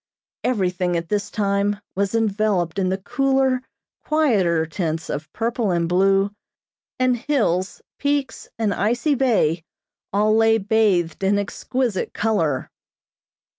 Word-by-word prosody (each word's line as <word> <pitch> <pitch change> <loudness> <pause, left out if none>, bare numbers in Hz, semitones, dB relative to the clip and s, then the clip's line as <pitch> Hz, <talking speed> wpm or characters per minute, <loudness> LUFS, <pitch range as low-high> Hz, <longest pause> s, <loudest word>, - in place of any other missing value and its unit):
Everything, 180 -6 0
at 165 0 -5
this 205 -1 -1
time, 200 -1 0
was 200 +2 -1
enveloped 205 -5 0
in 185 -1 +1
the 190 - 0
cooler, 265 +4 +1 0.4
quieter 200 - +2
tints 160 -1 -3
of 150 +1 -5
purple 230 -1 -1
and 170 -2 +1
blue, 195 +3 +3 0.7
and 255 -1 +3
hills, 220 - -1 0.2
peaks, 285 -1 -1
and 215 -3 0
icy 240 - +1
bay 205 - +2 0.5
all 210 +2 +3
lay 225 0 +4
bathed 200 -5 +1
in 200 +1 +3
exquisite 215 +1 -2
color. 165 -11 0
200 Hz, 120 wpm, -22 LUFS, 180-230 Hz, 0.7 s, lay